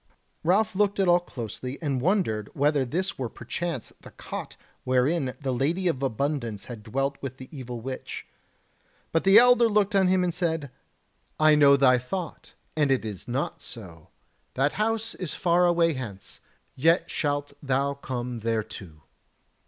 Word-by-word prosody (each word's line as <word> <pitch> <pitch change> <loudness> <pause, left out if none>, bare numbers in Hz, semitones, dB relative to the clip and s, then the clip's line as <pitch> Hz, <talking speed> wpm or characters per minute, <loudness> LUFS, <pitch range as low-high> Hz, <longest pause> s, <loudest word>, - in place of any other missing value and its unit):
Ralph 195 +5 +2
looked 200 0 +1
at 195 - +3
all 175 0 +6
closely, 125 -3 -7
and 140 -6 -1
wondered 145 - 0
whether 145 -1 +2
this 180 +8 -2
were 125 -3 -2
perchance 135 +4 -5
the - - -12
cot - - -8 0.3
wherein 130 +2 +1
the 135 -2 -2
Lady 155 +9 0
of 140 -6 0
Abundance 130 -4 -2
had 120 -3 -8
dwelt 135 +6 -2
with 130 -1 -6
the 130 - -10
evil 125 -3 -6
witch. 130 +2 -6 0.9
But 165 - +1
the 195 +2 +8
elder 245 -1 +6
looked 205 -1 +2
on 195 -2 +4
him, 185 0 +3
and 175 -1 0
said: 160 -6 -2 0.7
"I 155 0 +6
know 140 -2 +6
thy 130 -2 +5
thought, 165 +7 -6 0.2
and 150 -2 +2
it 130 -4 +1
is 105 -4 -6
not 130 +4 -3
so; 85 -9 -9 0.5
that 135 +3 +2
house 225 +2 -1
is 180 -5 -5
far 175 0 +3
away 170 -1 +3
hence; 110 -8 -8 0.4
yet 165 +6 +2
shalt 145 -1 -1
thou 140 0 0
come 125 -3 -5
thereto. 105 -8 -4
140 Hz, 160 wpm, -26 LUFS, 125-175 Hz, 0.9 s, the